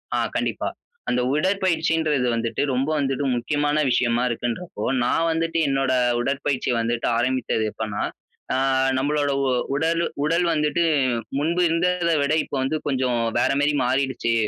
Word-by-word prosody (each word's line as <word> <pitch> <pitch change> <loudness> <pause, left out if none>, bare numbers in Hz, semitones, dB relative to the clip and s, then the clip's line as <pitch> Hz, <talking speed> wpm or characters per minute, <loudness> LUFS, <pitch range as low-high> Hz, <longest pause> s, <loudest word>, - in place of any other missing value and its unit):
ஆ - - +1 0.2
கண்டிப்பா, - - -1 0.4
அந்த 125 0 +1
உடற்பயிற்சின்றது 160 -5 +1
வந்துட்டு, 115 0 -2
ரொம்ப 135 +4 0
வந்துட்டு, 135 0 -1
முக்கியமான 145 +4 0
விஷயமா 120 0 +2
இருக்குன்றப்போ, 120 +1 -4 0.2
நான் 165 +6 +1
வந்துட்டு 165 +1 -1
என்னோட 135 -1 +1 0.3
உடற்பயிற்சிய 135 0 -1
வந்துட்டு, 115 +1 -1
ஆரம்பித்தது 125 -2 0
எப்பன்னா, 105 -2 -4 0.5
அ - - +1 0.4
நம்மளோட 145 +1 0 0.2
உ - - +1 0.3
உடலு 165 +3 +1 0.2
உடல் 170 +3 +2
வந்துட்டு 150 +2 +1 0.6
முன்பு 170 +4 0
இருந்தத 175 +1 +1
விட, 140 +1 0
இப்போ - - -6
வந்து 145 +4 -1
கொஞ்சம் 130 -3 0 0.2
வேற - - +2
மாரி 145 +1 +2
மாறிடுச்சு. 130 -2 0
140 Hz, 135 wpm, -23 LUFS, 125-160 Hz, 0.6 s, விஷயமா